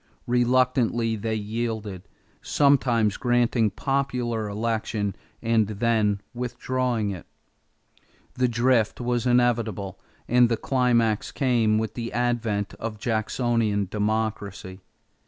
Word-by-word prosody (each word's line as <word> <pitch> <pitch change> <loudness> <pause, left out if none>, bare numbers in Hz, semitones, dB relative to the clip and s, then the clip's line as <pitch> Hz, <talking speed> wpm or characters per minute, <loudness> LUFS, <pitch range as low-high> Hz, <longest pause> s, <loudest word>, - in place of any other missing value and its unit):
Reluctantly 120 -2 +2
they 110 +1 -2
yielded, 110 -3 -4 0.3
sometimes 125 -7 +2
granting 120 -2 +2
popular 125 -3 -1
election 110 -2 -2 0.3
and 115 -2 +2
then 110 -1 +1
withdrawing 125 -2 -1
it. 90 -5 -8 1.1
The 125 0 +1
drift 120 -1 +2
was 120 0 -1
inevitable, 115 -6 +1 0.3
and 125 0 +4
the 115 - +1
climax 120 -4 +1
came 120 -6 +2
with 110 0 -2
the 115 -1 -5
advent 120 -4 -1
of 110 -1 -4
Jacksonian 110 -2 0
democracy. 105 -3 -2
115 Hz, 100 wpm, -25 LUFS, 105-120 Hz, 1.1 s, and